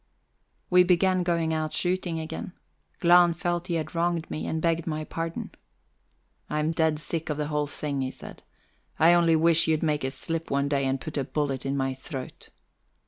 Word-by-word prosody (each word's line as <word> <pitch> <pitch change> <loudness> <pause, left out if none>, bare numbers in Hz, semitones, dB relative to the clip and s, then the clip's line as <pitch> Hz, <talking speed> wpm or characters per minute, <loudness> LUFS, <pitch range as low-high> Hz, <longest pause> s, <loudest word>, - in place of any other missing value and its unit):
IV - - -42
We 180 0 +7
began 185 +1 +3
going 170 -2 0
out 155 -1 -2
shooting 175 -2 -1
again. 160 +3 -6 0.5
Glahn 175 -1 +6
felt 175 +1 -2
he 170 - -1
had 155 -1 -3
wronged 170 -1 -1
me, 155 - -3
and 160 - -1
begged 165 0 0
my 155 -1 -2
pardon. 165 +1 -5 1.0
"And 150 - -2
I'm 150 +1 +1
dead 160 -2 +1
sick 160 +1 -3
of 150 - -1
the 150 0 -2
whole 150 -1 0
thing," 145 -1 -3
he 130 - -1
said. - - -11 0.6
"I 165 +2 +6
only 170 -1 +4
wish 165 +1 +4
you'd 160 0 +1
make 150 -3 0
a 130 - 0
slip 165 +4 -3
one 140 0 +1
day 140 -1 0
and 135 0 0
put 150 +2 -4
a - - 0
bullet 135 -1 -2
in 140 +1 -1
my 135 -1 0
throat." 130 0 -8
160 Hz, 195 wpm, -27 LUFS, 150-170 Hz, 1.0 s, We